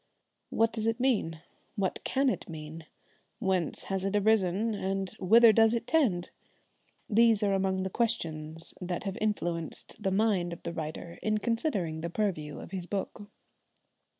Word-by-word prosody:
What 225 0 +2
does 220 -1 -1
it 225 +2 0
mean? 205 -11 +1 0.3
What 195 -3 -1
can 275 +1 +1
it - - -3
mean? 160 0 -8 0.5
Whence 190 -7 0
has 195 -1 -2
it 195 +1 -1
arisen, 210 0 +2
and 195 -1 -2
whither 225 +4 +7
does 225 +1 +5
it 230 - -2
tend? 225 - +1 0.8
These 225 0 +4
are 200 -1 +2
among 190 -1 +1
the 190 - -3
questions 165 -9 -2
that 175 -1 -3
have 195 -2 -3
influenced 175 -3 -3
the 195 - +1
mind 190 -3 +1
of 170 - -11
the - - -4
writer 165 +1 -6
in 215 0 +1
considering 210 - -1
the 170 - -3
purview 165 -7 -2
of - - -9
his 185 -2 -4
book. 205 +1 -4
195 Hz, 155 wpm, -30 LUFS, 170-220 Hz, 0.8 s, whither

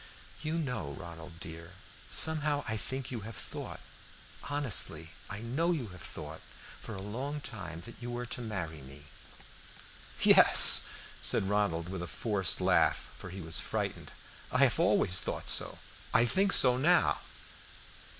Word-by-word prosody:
"You 155 +2 -3
know, 125 - -4
Ronald 85 +1 -10
dear, 85 +1 -9 0.3
somehow 150 -2 +4
I 110 - -2
think 130 +5 -5
you 120 - -4
have 110 +2 -9
thought - - -8 0.7
honestly, 105 - +2 0.2
I 100 +1 -6
know 135 +9 -1
you 135 -10 -3
have 90 -1 -12
thought 80 0 -9 0.4
for 110 - -8
a 95 - -7
long 130 +8 -5
time 95 - -7
that 115 - -10
you 120 - -6
were 120 0 -4
to 125 - -6
marry 90 - -5
me." 70 +2 -13 1.2
"Yes," - - +7 0.3
said - - +2
Ronald 100 -5 0
with 95 -1 -6
a 85 - -5
forced 95 +2 0
laugh, 90 -3 +1
for 95 - -9
he 95 +2 -8
was 80 0 +1
frightened. - - -4 0.4
"I - - +3
have - - +2
always 90 - +3
thought - - -4
so; - - +2 0.4
I 115 - +6
think 195 +10 +2
so 125 -6 +6
now." 170 +7 +3
105 Hz, 150 wpm, -31 LUFS, 85-130 Hz, 1.2 s, Yes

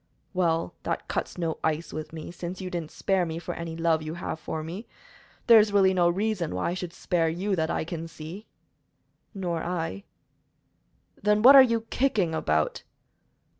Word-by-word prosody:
"Well, 165 - 0
that - - -3
cuts - - -3
no 165 -2 -2
ice 160 +1 -1
with 155 0 -5
me, 160 0 -7
since 175 +1 -6
you 185 -1 -5
didn't 170 -4 -4
spare 190 -2 0
me 165 -1 -3
for 175 +1 -5
any 170 -1 -6
love 165 -1 +2
you 155 +1 -5
have 175 -2 -5
for 155 0 -4
me. 180 +8 -7 0.6
There 230 -2 +9
is 210 0 +3
really 195 -2 +4
no 175 -2 +3
reason 190 - -1
why 90 - -1
I - - -2
should 180 -1 -5
spare 170 -1 0
you, 190 +5 -1
that 160 -2 0
I - - -1
can 165 0 -5
see." 165 +6 -9 0.9
"Nor 175 -4 -2
I." 165 - -3 1.2
"Then 210 +1 +2
what 270 +3 +10
are 270 - +12
you 230 -3 +3
kicking 215 -11 +1
about?" 80 - 0
175 Hz, 180 wpm, -27 LUFS, 160-195 Hz, 1.2 s, are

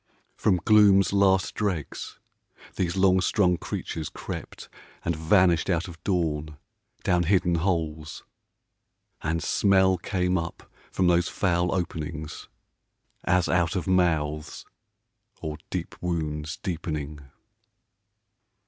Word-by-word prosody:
From 95 -3 +2
gloom's 100 -3 +5
last 95 -1 +3
dregs 95 -8 -3 0.6
these 90 0 -1
long 95 -1 +4
strung 90 -1 +2
creatures 80 -2 -5
crept, - - -8 0.4
And 85 - 0
vanished 85 +2 +3
out 85 -1 0
of 85 -3 -12
dawn 75 -5 -1 0.5
down 90 -1 +2
hidden 90 -1 +2
holes. 80 -3 -2 1.0
(And 80 +1 -1
smell 95 -2 +3
came 90 -1 0
up 80 0 -6 0.3
from 95 - +1
those 90 0 +3
foul 90 -2 +1
openings 80 -3 -4 0.8
As 90 0 +2
out 85 -2 +1
of 90 - -1
mouths, 80 -5 0 0.7
or 75 -1 -5
deep 90 -2 -4
wounds 80 -3 -3
deepening.) 75 -4 -4
85 Hz, 105 wpm, -26 LUFS, 80-95 Hz, 1.0 s, gloom's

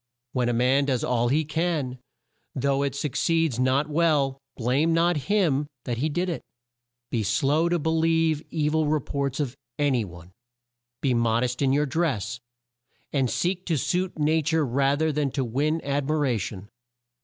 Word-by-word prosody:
"When 125 -2 +1
a - - +1
man 130 +4 +3
does 130 -4 0
all 120 -1 +1
he 150 +5 +2
can, 155 -5 -1 0.6
though 140 +1 +1
it 140 -1 -1
suc 140 0 -2
ceeds 165 -6 +1
not 130 +3 +2
well, 150 -4 +1 0.2
blame 135 +7 +2
not 170 +1 +3
him 160 -9 +2 0.2
that 120 -2 -3
did 175 +4 -1
it. 170 - -3 0.7
"Be 115 - 0
slow 140 +10 +2
to 175 - +2
be 160 0 -1
lieve 160 -1 +2
e 150 -2 0
vil 155 0 +1
re 155 +1 +2
ports 140 0 -3
of 135 -4 -2 0.2
a 145 -1 +2
ny 125 -3 +1
one. 85 -2 -11 0.7
"Be 135 -3 +2
mod 115 0 +2
est 125 +1 -2
in 135 - +3
your 145 +2 +2
dress 135 - -1 0.7
and 135 -4 +1
seek 180 - -1
to 165 -3 +1
suit 180 +7 -1
na 155 +1 +2
ture 160 +1 +1
rather 140 +5 +1
than 150 -1 0
to 135 - 0
win 145 +7 0
ad 140 0 -1
mi 155 - +2
ra 140 -5 +1
tion. 100 -1 -6
140 Hz, 180 wpm, -25 LUFS, 125-160 Hz, 0.7 s, man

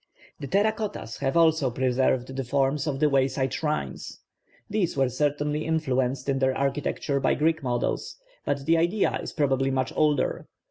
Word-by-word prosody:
The 140 - -5
terra 205 +8 +3
cottas 210 - -5
have 135 +2 0
also 160 -4 +4
preserved 130 +1 0
the 135 - -2
forms 135 +3 0
of 135 -2 -2
the 150 - +4
wayside 135 -1 +1
shrines. 150 +2 -3 0.5
These 205 -8 -1
were 135 -2 +3
certainly 145 +3 -1
influenced 135 -5 -1
in 135 -1 +1
their 130 0 +1
architecture 140 +1 -1
by - - +2
Greek 160 +2 +1
models, 125 -3 -2 0.3
but 140 -1 -2
the 165 +2 +4
idea 175 +5 +1
is - - -6
probably 135 -3 +1
much 130 -1 -1
older. 150 -3 +1
140 Hz, 165 wpm, -26 LUFS, 130-155 Hz, 0.5 s, also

